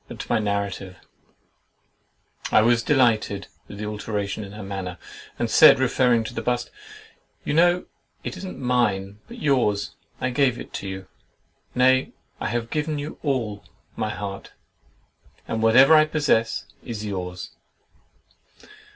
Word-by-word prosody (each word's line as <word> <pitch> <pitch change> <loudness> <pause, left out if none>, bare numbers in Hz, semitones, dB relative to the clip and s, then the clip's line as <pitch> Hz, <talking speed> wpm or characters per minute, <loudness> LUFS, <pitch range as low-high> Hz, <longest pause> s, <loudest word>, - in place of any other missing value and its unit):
But - - -9
to - - -7
my 120 - +3
narrative.— 100 -2 -3 1.5
I 110 - +6
was 120 0 +4
delighted 115 -8 +2 0.2
with 100 - -10
the 105 - -5
alteration 105 -1 -3
in 100 0 -10
her 105 0 -8
manner, 95 -2 -5 0.4
and - - 0
said, - - +8
referring 120 -3 +2
to 110 - -7
the - - -3
bust—"You 120 +3 -6
know 175 +3 +4 0.4
it - - -5
is 185 - -9
not 185 - -6
mine, 105 -6 0
but 235 - -10
yours; 125 - +1 0.3
I 130 0 -1
gave 125 -1 +2
it - - -7
you; 95 -1 -6 0.7
nay, 130 +1 +3 0.3
I - - -2
have 120 -1 -3
given 150 0 -1
you 145 +2 -6
all—my 110 -5 -4
heart, 100 -2 -6 0.9
and 110 - -2
whatever 130 +7 +7
I 155 -1 +7
possess, 145 -7 +1 0.2
is 110 -2 -5
yours! 90 -3 -5
115 Hz, 135 wpm, -24 LUFS, 100-130 Hz, 1.5 s, said